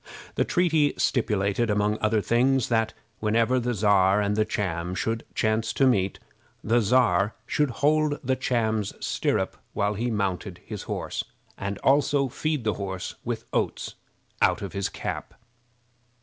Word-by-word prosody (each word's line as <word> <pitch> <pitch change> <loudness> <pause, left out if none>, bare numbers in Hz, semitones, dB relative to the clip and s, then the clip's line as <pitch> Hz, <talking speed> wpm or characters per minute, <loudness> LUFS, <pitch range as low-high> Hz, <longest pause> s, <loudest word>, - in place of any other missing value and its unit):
The - - +2
treaty 160 -5 +2
stipulated, 110 -2 +1
among 105 +1 +1
other 110 0 +2
things, 125 +3 +2
that 115 -1 +1 0.2
whenever 115 +4 +2
the 120 0 -1
Czar 100 -1 +4
and 105 0 +1
the 110 0 +2
Cham 90 -4 -2
should 115 +4 -1
chance 110 0 +1
to 135 - +3
meet, 100 -7 +2 0.5
the 120 +2 +3
Czar 110 -3 +3
should 150 -2 +1
hold 150 +4 +2
the 130 +1 +1
Cham's 110 -5 0
stirrup - - -1 0.2
while 105 +1 0
he 115 +4 -2
mounted 95 -4 -2
his 105 -3 -6
horse, - - -3 0.3
and 100 +1 -4
also 140 0 +3
feed 155 +1 -2
the 110 -1 +1
horse 95 -2 -4
with - - -4
oats - - -1 0.5
out - - +3
of 100 - -5
his 100 -1 -1
cap. - - -5
110 Hz, 150 wpm, -26 LUFS, 100-125 Hz, 0.5 s, Czar